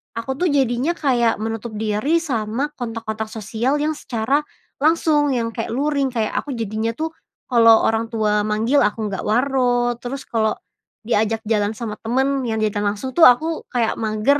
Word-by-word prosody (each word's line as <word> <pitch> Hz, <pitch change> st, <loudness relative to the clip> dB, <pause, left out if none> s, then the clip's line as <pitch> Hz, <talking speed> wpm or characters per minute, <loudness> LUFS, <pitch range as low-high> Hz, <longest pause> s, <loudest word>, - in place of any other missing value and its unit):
aku 230 Hz, +3 st, -3 dB
tuh 360 Hz, -, +2 dB
jadinya 270 Hz, +3 st, +1 dB
kayak 245 Hz, -7 st, +2 dB
menutup 225 Hz, 0 st, -4 dB
diri 215 Hz, +8 st, 0 dB
sama 245 Hz, 0 st, -2 dB
kontak-kontak 225 Hz, -2 st, -4 dB
sosial 225 Hz, +5 st, -1 dB
yang 300 Hz, +1 st, 0 dB
secara 245 Hz, +3 st, 0 dB, 0.4 s
langsung, 300 Hz, -2 st, +3 dB
yang 230 Hz, -1 st, -1 dB
kayak 225 Hz, -1 st, -4 dB
luring. 280 Hz, +1 st, +1 dB
Kayak 220 Hz, -3 st, -1 dB
aku 280 Hz, -3 st, -5 dB
jadinya 220 Hz, 0 st, -2 dB
tuh 320 Hz, +3 st, -3 dB, 0.4 s
kalau 230 Hz, -3 st, +6 dB
orang 225 Hz, +1 st, 0 dB
tua 210 Hz, -2 st, +1 dB
manggil 225 Hz, +7 st, +2 dB
aku 210 Hz, +1 st, 0 dB
nggak 195 Hz, -, -4 dB
waro, 245 Hz, 0 st, +2 dB
terus 265 Hz, +2 st, -5 dB
kalau 220 Hz, -2 st, 0 dB, 0.5 s
diajak 225 Hz, 0 st, +1 dB
jalan 210 Hz, -2 st, +1 dB
sama 220 Hz, -2 st, -5 dB
teman 265 Hz, +4 st, 0 dB
yang 220 Hz, -1 st, -1 dB
diajak 210 Hz, -1 st, 0 dB
langsung 205 Hz, +6 st, -2 dB
tuh 340 Hz, -, +7 dB
aku 315 Hz, +6 st, +2 dB
kayak 235 Hz, -3 st, 0 dB
mager, 220 Hz, +6 st, +1 dB
230 Hz, 165 wpm, -21 LUFS, 220-270 Hz, 0.5 s, tuh